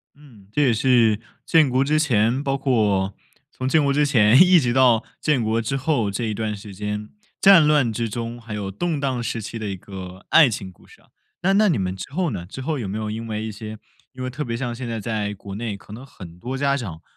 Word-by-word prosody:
嗯， 125 Hz, -9 st, -18 dB
这 150 Hz, -, +2 dB
也 125 Hz, -4 st, +3 dB
是 115 Hz, -2 st, +3 dB, 0.3 s
建 160 Hz, -5 st, +4 dB
国 130 Hz, +1 st, +2 dB
之 150 Hz, +2 st, +1 dB
前， 125 Hz, -2 st, +2 dB
包 135 Hz, -1 st, 0 dB
括 105 Hz, -7 st, +1 dB, 0.4 s
从 130 Hz, -, -4 dB
建 155 Hz, +1 st, +3 dB
国 140 Hz, -1 st, +2 dB
之 150 Hz, +1 st, +3 dB
前 125 Hz, -2 st, +5 dB
一 180 Hz, -1 st, +7 dB
直 120 Hz, -5 st, 0 dB
到 125 Hz, -3 st, +4 dB, 0.2 s
建 150 Hz, -6 st, +1 dB
国 110 Hz, +1 st, 0 dB
之 125 Hz, +5 st, -2 dB
后 135 Hz, -6 st, 0 dB
这 115 Hz, +4 st, -3 dB
一 110 Hz, -, -2 dB
段 105 Hz, 0 st, -3 dB
时 100 Hz, 0 st, -10 dB
间， 105 Hz, +2 st, -4 dB, 0.3 s
战 195 Hz, -6 st, +7 dB
乱 145 Hz, -6 st, +3 dB
之 115 Hz, +1 st, -2 dB
中 115 Hz, +2 st, -5 dB
还 115 Hz, -2 st, -9 dB
有 100 Hz, -2 st, -4 dB
动 155 Hz, -, -2 dB
荡 130 Hz, -3 st, -1 dB
时 115 Hz, 0 st, -3 dB
期 115 Hz, -, -6 dB
的 110 Hz, -, -4 dB
一 95 Hz, -, -3 dB
个 95 Hz, 0 st, -10 dB
爱 155 Hz, -5 st, +7 dB
情 100 Hz, -4 st, -5 dB
故 90 Hz, -, -22 dB
事 -, -, -19 dB
啊， -, -, -28 dB, 0.3 s
那 195 Hz, +2 st, +2 dB
那 210 Hz, +2 st, +4 dB
你 165 Hz, -, +2 dB
们 95 Hz, -1 st, -2 dB
之 95 Hz, -, -8 dB
后 170 Hz, +1 st, -1 dB
呢？ 90 Hz, -6 st, -5 dB
之 95 Hz, -, -10 dB
后 150 Hz, +2 st, -2 dB
有 110 Hz, -, -4 dB
没 100 Hz, +3 st, -4 dB
有 110 Hz, -1 st, -3 dB
因 115 Hz, +1 st, -5 dB
为 110 Hz, -1 st, -3 dB
一 110 Hz, -, -4 dB
些 110 Hz, +1 st, -8 dB, 0.4 s
因 130 Hz, -1 st, -7 dB
为 130 Hz, -, -2 dB
特 130 Hz, +4 st, -4 dB
别 115 Hz, -3 st, -3 dB
像 120 Hz, -1 st, -3 dB
现 125 Hz, 0 st, -6 dB
在 115 Hz, -1 st, -3 dB
在 105 Hz, -2 st, -2 dB
国 100 Hz, 0 st, -9 dB
内 110 Hz, -1 st, -4 dB
可 100 Hz, -, -14 dB
能 125 Hz, +5 st, -9 dB
很 90 Hz, -9 st, -12 dB
多 130 Hz, +6 st, -4 dB
家 140 Hz, 0 st, +1 dB
长 95 Hz, -, -6 dB
115 Hz, 270 characters per minute, -22 LUFS, 105-135 Hz, 0.4 s, 一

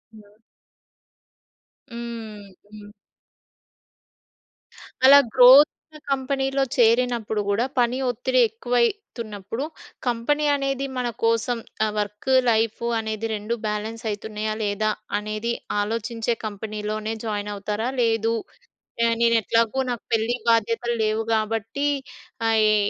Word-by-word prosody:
హ్మ్. 210 Hz, 0 st, -18 dB, 1.5 s
హ్మ్. 225 Hz, -3 st, -7 dB, 0.2 s
హ్మ్. 210 Hz, -1 st, -11 dB, 2.2 s
అలా 280 Hz, +1 st, +10 dB, 0.2 s
గ్రోత్ 260 Hz, +4 st, +9 dB, 0.4 s
కంపెనీలో 270 Hz, 0 st, 0 dB
చేరినప్పుడు 230 Hz, -2 st, +2 dB
గూడా 210 Hz, +5 st, +1 dB
పని 245 Hz, +1 st, +2 dB
ఒత్తిడి 250 Hz, +2 st, 0 dB
ఎక్కువైతున్నప్పుడు, 235 Hz, -, -2 dB, 0.4 s
కంపెనీ 270 Hz, +6 st, 0 dB
అనేది 275 Hz, -1 st, -2 dB
మన 250 Hz, -1 st, -1 dB, 0.2 s
కోసం 230 Hz, +1 st, +1 dB, 0.3 s
ఆ -, -, +1 dB
వర్క్, 210 Hz, +5 st, -3 dB, 0.2 s
లైఫు 225 Hz, +1 st, 0 dB
అనేది 220 Hz, 0 st, -3 dB
2 210 Hz, +3 st, -3 dB
బ్యాలెన్స్ 220 Hz, +2 st, -4 dB
అయితున్నాయా 215 Hz, +1 st, -3 dB
లేదా 210 Hz, +1 st, 0 dB, 0.3 s
అనేది 215 Hz, +3 st, -3 dB, 0.3 s
ఆలోచించే 230 Hz, +2 st, -2 dB
కంపెనీలోనే 215 Hz, +1 st, -4 dB
జాయిన్ 210 Hz, -1 st, -3 dB
అవుతారా? 210 Hz, +3 st, -3 dB
లేదు, 225 Hz, 0 st, +1 dB, 0.9 s
నేను 230 Hz, 0 st, +4 dB
ఎట్లాగో 230 Hz, +4 st, +1 dB
నాకు 235 Hz, -, -5 dB
పెళ్లి 225 Hz, +2 st, +1 dB
బాధ్యతలు 230 Hz, +1 st, +1 dB
లేవు 215 Hz, +1 st, 0 dB
కాబట్టి 225 Hz, +6 st, -1 dB, 0.6 s
ఆహ్, 220 Hz, -1 st, +3 dB
యె 215 Hz, 0 st, +4 dB
225 Hz, 100 wpm, -23 LUFS, 215-240 Hz, 2.2 s, అలా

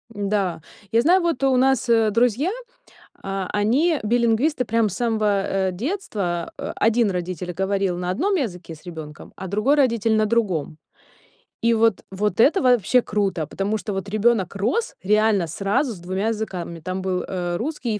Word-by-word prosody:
Н-да, 200 Hz, -4 st, -1 dB, 0.3 s
я 230 Hz, -, +4 dB
знаю, 360 Hz, +7 st, +4 dB
вот 335 Hz, -6 st, -1 dB
у 270 Hz, -1 st, +4 dB
нас, 260 Hz, -1 st, +2 dB
э, 225 Hz, -2 st, +4 dB
друзья, 245 Hz, -, +2 dB, 0.7 s
а, 195 Hz, -1 st, -3 dB
они 270 Hz, +10 st, +2 dB
билингвисты, 235 Hz, +5 st, +1 dB
прям 225 Hz, -1 st, +1 dB
с 190 Hz, -, -6 dB
самого, 215 Hz, -4 st, +1 dB
э, 190 Hz, -1 st, -1 dB
детства, 200 Hz, -, -3 dB
э, -, -, -4 dB
один 225 Hz, -1 st, +2 dB
родитель 180 Hz, -1 st, -4 dB
говорил 190 Hz, 0 st, -1 dB
на 180 Hz, 0 st, -3 dB
одном 380 Hz, -, 0 dB
языке 180 Hz, -, -3 dB
с 155 Hz, -, -17 dB
ребёнком, 160 Hz, -3 st, -9 dB
а 190 Hz, -, -6 dB
другой 215 Hz, +10 st, +2 dB
родитель 230 Hz, -5 st, +2 dB
на 215 Hz, 0 st, +3 dB
другом. 190 Hz, -9 st, -1 dB, 0.8 s
И 230 Hz, 0 st, +3 dB
вот, 225 Hz, -2 st, +2 dB
вот 210 Hz, +3 st, -2 dB
это 300 Hz, -, +5 dB
вообще 250 Hz, -1 st, +4 dB
круто, 195 Hz, -8 st, -1 dB
потому 200 Hz, +7 st, -2 dB
что 210 Hz, 0 st, -5 dB
вот 195 Hz, +1 st, -4 dB
ребёнок 215 Hz, -2 st, +1 dB
рос 245 Hz, -, -1 dB
реально 210 Hz, -2 st, +2 dB
сразу 205 Hz, -, 0 dB
с 185 Hz, -, -11 dB
2 185 Hz, +4 st, -2 dB
языками, 190 Hz, -6 st, -4 dB
там 185 Hz, +4 st, -4 dB
был, 185 Hz, -1 st, -1 dB
э, 175 Hz, -2 st, -3 dB
русский 250 Hz, -, -3 dB
и 210 Hz, -, -4 dB
210 Hz, 170 wpm, -22 LUFS, 190-235 Hz, 0.8 s, это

